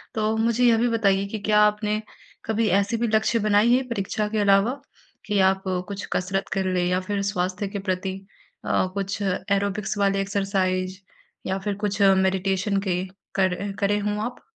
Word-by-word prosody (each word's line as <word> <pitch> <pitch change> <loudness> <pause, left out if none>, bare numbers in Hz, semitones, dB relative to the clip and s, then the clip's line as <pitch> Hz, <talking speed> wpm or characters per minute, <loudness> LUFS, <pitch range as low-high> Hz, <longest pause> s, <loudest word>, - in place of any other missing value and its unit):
तो 215 0 0
मुझे 235 +2 +2
यह 230 -1 +5
भी 240 +2 +2
बताइए 200 -4 +2
कि 215 +2 -5
क्या 210 +1 +2
आपने, 210 0 +2 0.4
कभी 220 0 0
ऐसी 200 +5 +2
भी 235 +1 0
लक्ष्य 220 +1 +2
बनाई 215 +2 +3
है 260 - +1
परीक्षा 210 -1 -2
के 215 0 -1
अलावा 205 +7 +3 0.4
कि, 205 -2 0
आप 190 0 +3 0.2
कुछ 200 -1 -5
कसरत 195 +2 -1
कर 190 -1 -1
लें 180 -1 +1
या 180 +1 +1
फिर 200 +2 -2
स्वास्थ्य 185 +1 -2
के 200 +1 -5
प्रति 185 +1 -2 0.5
अ, 185 - +1
कुछ 200 +1 -3
एरोबिक्स 200 +1 -1
वाले 195 -1 +2
एक्सरसाइज़ 190 -2 -1 0.5
या 190 - 0
फिर 205 0 -1
कुछ 205 0 -2
मेडिटेशन 195 +1 +2
के 180 0 0 0.3
कर 190 +1 0
करें 205 0 +1
हों 210 0 -1
आप? 245 +1 -7
200 Hz, 175 wpm, -24 LUFS, 190-215 Hz, 0.5 s, यह